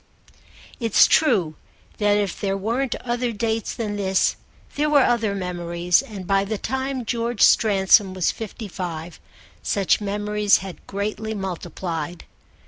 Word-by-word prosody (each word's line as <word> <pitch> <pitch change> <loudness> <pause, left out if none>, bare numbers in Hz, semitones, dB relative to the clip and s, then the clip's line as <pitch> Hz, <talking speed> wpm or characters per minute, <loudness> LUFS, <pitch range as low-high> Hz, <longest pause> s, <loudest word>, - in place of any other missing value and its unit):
It's 230 -4 +5
true 175 - +2 0.4
that 205 -1 +3
if 200 -3 -2
there 195 -1 0
weren't 235 +6 -1
other 240 0 -1
dates 225 0 -2
than 210 -3 -3
this 190 -1 +1 0.4
there 300 +1 +1
were 290 -3 +5
other 225 -4 +1
memories; 175 -2 0
and 200 -4 -9
by 195 +1 +2
the 210 +2 -3
time 265 +1 -3
George 235 0 -2
Stransom 195 -2 +4
was 185 -2 +1
fifty 220 0 -7
five 170 -3 -6 0.4
such 200 0 +1
memories 205 0 +2
had 190 -2 -9
greatly 215 +2 -3
multiplied. 175 -3 -5
205 Hz, 135 wpm, -23 LUFS, 185-225 Hz, 0.4 s, It's